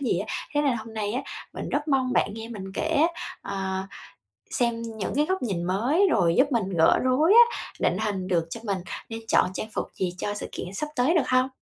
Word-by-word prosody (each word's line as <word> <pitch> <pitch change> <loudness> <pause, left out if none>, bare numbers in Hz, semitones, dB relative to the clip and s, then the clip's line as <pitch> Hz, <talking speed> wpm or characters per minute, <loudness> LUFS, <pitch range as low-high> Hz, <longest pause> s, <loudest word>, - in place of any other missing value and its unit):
gì 245 -10 +1
á. 200 - -3 0.3
Thế 290 - +3
nên 275 -4 +2
hôm 220 0 -8
nay 210 -1 -2
á, 255 +4 -1 0.3
mình - - -5
rất 295 +2 -1
mong 260 -3 +2
bạn 205 - +1
nghe 225 0 -7
mình 195 -4 -7
kể - - -1
á, 320 +1 +4 0.3
ờ, 190 -1 -3 0.7
xem 235 -2 0
những 220 -3 -4
cái 295 +1 +3
góc 375 +3 -1
nhìn 195 -8 -2
mới, 240 - +2
rồi 170 -6 +3
giúp 275 +2 +4
mình 225 -6 +1
gỡ 160 - +5
rối 290 +9 +4
á, 475 +1 +7 0.2
định - - +1
hình 200 -4 -2
được 170 -3 +1
cho 230 - -5
mình 200 -4 -1 0.3
nên 225 0 -5
chọn 180 - +4
trang 215 - -4
phục - - -2
gì 180 -2 -2
cho 205 - -2
sự 205 - -6
kiện 180 - -6
sắp 300 +10 -3
tới 255 +7 +3
được 295 -7 +2
hông? 255 0 +3
225 Hz, 230 wpm, -26 LUFS, 195-275 Hz, 0.7 s, á